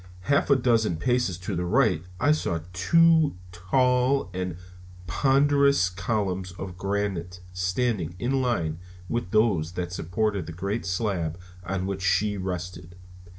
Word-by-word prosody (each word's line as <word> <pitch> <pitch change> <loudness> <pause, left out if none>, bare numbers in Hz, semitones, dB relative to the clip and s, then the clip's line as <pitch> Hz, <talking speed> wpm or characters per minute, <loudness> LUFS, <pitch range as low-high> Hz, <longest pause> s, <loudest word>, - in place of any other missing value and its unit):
Half 140 +9 +1
a 140 - +6
dozen 115 -8 +2
paces 120 -3 0
to 90 +2 -4
the 90 - -1
right 105 - +2 0.2
I 145 +4 +3
saw 85 - 0
two 160 - +4
tall 125 +6 +1
and 90 -2 -3 0.5
ponderous 140 +1 +3
columns 95 -2 -2
of 90 0 -7
granite 95 -2 -3
standing 90 -1 -1
in 130 +5 0
line 85 -11 -1 0.3
with 115 -2 -2
those 95 -7 +2
that 90 -1 -4
supported 100 +3 -1
the 85 - -6
great 100 +6 -3
slab 90 -4 -2 0.2
on 95 +1 -3
which 95 0 -3
she 105 +3 +2
rested. 90 -2 -5
95 Hz, 135 wpm, -26 LUFS, 90-120 Hz, 0.5 s, a